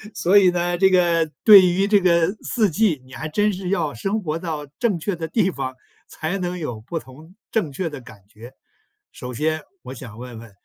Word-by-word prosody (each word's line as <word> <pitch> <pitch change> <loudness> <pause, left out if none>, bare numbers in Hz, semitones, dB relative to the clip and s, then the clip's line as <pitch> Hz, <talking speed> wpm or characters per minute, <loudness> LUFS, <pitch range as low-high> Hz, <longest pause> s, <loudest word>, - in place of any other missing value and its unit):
天。 215 - -13
所 195 +1 +4
以 190 -2 +5
呢， 175 0 -1
这 190 0 +5
个 170 -3 +2
对 200 -4 +10
于 185 +3 +1
这 205 0 +4
个 170 -1 +3
四 215 -6 +1
季， 165 -4 +1
你 130 - -18
还 155 +3 -6
真 205 +6 +1
是 185 -1 -5
要 170 -6 0
生 195 - -2
活 160 -2 -3
到 155 -4 -5
正 215 -8 0
确 195 +4 -2
的 165 -1 -5
地 195 +1 +1
方， 130 -5 -5 0.3
才 170 +5 -4
能 180 0 -3
有 120 -10 -5
不 165 +9 -5
同 155 +6 -15 0.2
正 205 -10 -1
确 165 +4 -3
的 145 -2 -8
感 115 -4 -14
觉。 115 +4 -13 0.6
首 125 -4 -8
先 155 +4 -1 0.2
我 130 - -8
想 115 -4 -10
问 120 -2 -9
问， 115 -1 -12
170 Hz, 230 characters per minute, -22 LUFS, 145-190 Hz, 0.6 s, 对